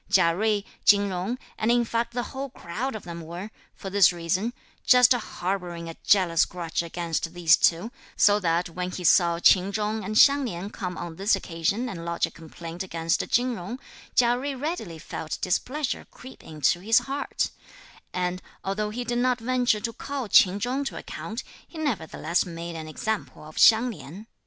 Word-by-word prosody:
Chia 185 -4 +4
Jui, 210 +2 0 0.2
Chin 200 0 +5
Jung 190 +6 -2 0.2
and 220 - +1
in 240 0 +3
fact 235 +1 -2
the 245 - 0
whole 270 +1 -4
crowd 235 +5 -5
of 215 - -7
them 170 -1 -7
were, 175 +6 -7 0.2
for 195 - -7
this 200 -1 +6
reason, 175 +6 -1 0.3
just 250 0 +7
harbouring 180 -6 -4
a 165 - -7
jealous 180 -5 +4
grudge 170 -2 -3
against 170 0 -3
these 170 -2 +6
two, 175 +8 +2 0.3
so 205 0 +5
that 170 -1 +1
when 180 +1 -3
he 180 0 -6
saw 170 0 +4
Ch'in 185 +2 +4
Chung 215 +1 -2
and 215 - -4
Hsiang 280 +4 +6
Lin 195 -2 -5
come 180 -4 -5
on 170 -2 -6
this 200 +2 +3
occasion 190 +6 -2
and 175 -8 -6
lodge 170 0 0
a - - -10
complaint 165 +1 -9
against 165 -3 -1
Chin 250 +1 +2
Jung, 220 +5 -6 0.4
Chia 240 -1 +5
Jui 270 0 -4
readily 295 - -4
felt 155 0 -5
displeasure 255 - -2
creep 260 +1 -13
into 155 +2 0
his 225 +5 +3
heart; 275 +1 -1 0.6
and, 180 0 -2 0.2
although 210 +2 -2
he 240 +4 -4
did 240 0 -1
not 250 0 +2
venture 245 -2 +1
to 230 +1 -3
call 275 0 -5
Ch'in 195 0 +5
Chung 255 +6 -1
to 270 - -5
account, 225 +4 -6 0.2
he 330 - -12
nevertheless 180 - -1
made 170 -1 -7
an 160 -1 -6
example 215 +6 -4
of 155 +1 -12
Hsiang 230 +2 +6
Lin. 195 0 -10
195 Hz, 180 wpm, -26 LUFS, 170-235 Hz, 0.6 s, just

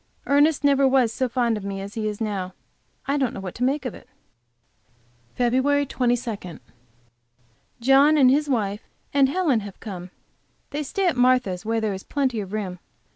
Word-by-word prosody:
Ernest 290 +2 +3
never 275 -1 +4
was 255 -4 +3
so 260 0 -1
fond 235 -2 +1
of 210 - -7
me 195 0 -4
as 200 +1 -7
he 220 -1 -2
is 210 -1 -4
now. 195 -4 -3 0.5
I 280 +1 0
don't 265 -4 -1
know - - -5
what 190 -2 -6
to 245 - -4
make 275 +2 0
of 250 - -3
it. - - -14 1.3
FEB 260 +4 +2
22. 235 - -2 1.2
John 275 +5 +5
and 260 -3 +6
his 295 +2 +1
wife 210 -5 -1 0.3
and 275 -1 +4
Helen 300 -7 +1
have 200 -2 -9
come. 185 -4 -7 0.6
They 290 +2 -2
stay 375 +7 -2
at 345 - +2
Martha's, 245 -7 +2
where 225 0 +1
there 215 -2 -1
is 190 - -6
plenty 260 -3 -1
of 195 -2 -6
room. 195 -4 -4
245 Hz, 180 wpm, -24 LUFS, 205-275 Hz, 1.3 s, and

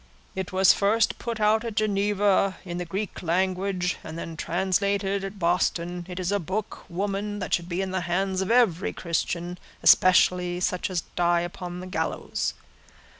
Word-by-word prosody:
"It 190 -1 -4
was 190 0 +6
first 215 +3 +2
put 230 -2 -4
out 215 +1 +3
at 230 -3 -5
Geneva 205 -2 +2
in 175 -1 -4
the 180 - -3
Greek 195 +4 -4
language, 185 +1 0
and 160 +1 -7
then 165 -1 -6
translated 195 +3 0
at 195 +1 -6
Boston. 175 0 0
It 180 0 -5
is 185 +1 -1
a 205 - +1
book, 200 +5 -4
woman, 200 +3 -2
that 195 - -4
should 175 0 0
be 180 +2 -1
in 190 - -4
the 185 -1 -1
hands 185 +2 0
of 190 - -2
every 225 -7 +3
Christian, 175 +1 -2 0.2
especially 180 -1 +5
such 180 +1 -1
as 180 -3 -1
die 175 0 +3
upon 175 0 -6
the - - -7
gallows. 185 - -2
185 Hz, 170 wpm, -26 LUFS, 175-200 Hz, 0.2 s, was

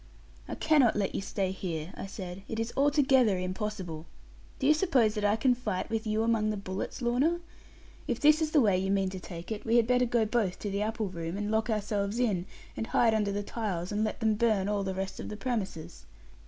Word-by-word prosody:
'I - - -4
cannot 295 -7 +4
let 200 -2 0
you - - -2
stay 195 -1 -2
here,' 170 -3 -5
I - - -6
said; 185 -1 -7
'it 225 - -4
is 225 +1 -2
altogether 270 -7 +4
impossible. 185 -3 -4 0.5
Do - - -3
you 300 - +7
suppose 275 - +2
that 210 -1 -3
I 205 +1 +3
can 250 +3 +3
fight, 230 -5 -3
with 225 0 -2
you 215 +1 +1
among 225 -2 +2
the 215 - -1
bullets, 195 +5 -5
Lorna? 270 +9 +2 0.7
If - - -1
this 305 +2 +5
is 315 - +1
the 300 -2 +4
way 200 -5 +3
you 190 +1 -1
mean 195 -1 +1
to 190 - -6
take 175 +1 -8
it, 215 -1 -4
we 230 0 +1
had 235 -2 +5
better 250 +1 +3
go 235 -2 +2
both 215 -5 0
to 205 - -4
the 200 +1 -1
apple 215 -1 -1
room, 170 0 -5
and 205 +1 -2
lock 220 +1 +1
ourselves 210 -1 -1
in, 200 -7 0 0.3
and 225 - -3
hide 230 -2 +3
under 210 -2 +1
the 205 +1 -2
tiles, 195 -5 -3
and 210 +1 0
let 215 +2 -3
them 220 -1 +3
burn 215 -3 +2
all 205 -1 0
the 190 -1 -3
rest 190 0 -4
of - - -5
the 210 - -6
premises.' 190 - -4
210 Hz, 230 wpm, -29 LUFS, 190-235 Hz, 0.7 s, you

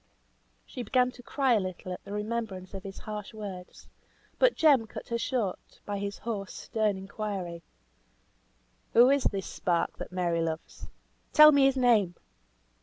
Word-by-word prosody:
She 250 - -7
began 250 0 +2
to 250 - -14
cry 265 +1 +1
a 220 - +4
little 185 -1 -5
at - - -9
the 200 - -10
remembrance 210 -3 -4
of 195 - -6
his 195 0 -9
harsh 210 0 -7
words; 190 -4 -8 0.5
but - - +4
Jem 280 -8 +4
cut - - -9
her 235 - 0
short 230 -8 -3
by 205 -1 -3
his 200 0 -4
hoarse, 205 -4 -5
stern 215 -3 -1
inquiry, 190 -3 -5 1.3
"Who 245 +3 +7
is 280 -2 +2
this 195 -2 0
spark 170 -2 -1
that - - -7
Mary 175 -2 0
loves? 160 -1 -5 0.5
Tell 305 0 +10
me 280 -2 +5
his 270 0 +3
name!" 220 -8 +3
210 Hz, 160 wpm, -29 LUFS, 185-245 Hz, 1.3 s, Tell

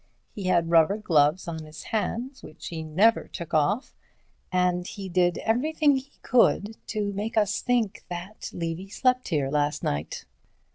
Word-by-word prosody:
He 200 - -6
had 170 -2 +2
rubber 165 +4 +5
gloves 160 -4 +2
on 160 -2 -5
his 155 0 -10
hands 235 +5 -3
which 155 - -9
he 165 -2 -5
never 190 +9 +3
took 170 -3 -8
off, 190 - +1 0.6
and 180 -1 +1
he 195 -1 -7
did 175 -1 +2
everything 290 +5 +2
he 270 +2 -9
could 225 -3 +3
to 205 -2 -2
make 215 +3 -3
us 210 -1 +2
think 235 -5 0
that 180 +4 -6
Levy 170 +3 -4
slept 255 +4 +1
here 145 -5 0
last 145 0 0
night. 75 +2 -3
185 Hz, 155 wpm, -26 LUFS, 165-220 Hz, 0.6 s, rubber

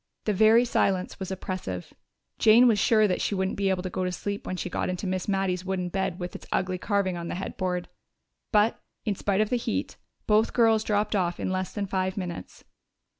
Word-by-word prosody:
The 210 - +1
very 220 +4 +5
silence 195 -5 0
was 190 - -4
oppressive; 185 - -5 0.5
Jane 230 +3 +7
was 220 -4 +3
sure 215 +1 +4
that 180 - -1
she 205 - 0
wouldn't 190 0 -1
be 200 -1 0
able 185 -1 0
to 185 - -3
go 185 - -2
to 180 - -1
sleep 200 +2 -4
when 185 - -3
she - - -3
got 180 - -2
into 185 +2 -3
Miss 185 -1 -2
Mattie's 190 -2 0
wooden 185 -1 -2
bed 190 -1 -2
with 175 0 -5
its - - -9
ugly 185 -1 0
carving 200 -3 0
on 170 0 -5
the - - -3
headboard. 180 -1 -3 0.6
But, 215 +1 +3 0.3
in 210 - +1
spite 200 +1 0
of 215 - 0
the 250 - +3
heat, 235 - -3 0.3
both 215 +1 +3
girls 225 -2 +4
dropped 210 0 0
off 175 -3 0
in - - -2
less 185 0 -2
than 205 -2 -2
five 190 0 -2
minutes. 180 -3 -6
190 Hz, 215 wpm, -27 LUFS, 185-210 Hz, 0.6 s, Jane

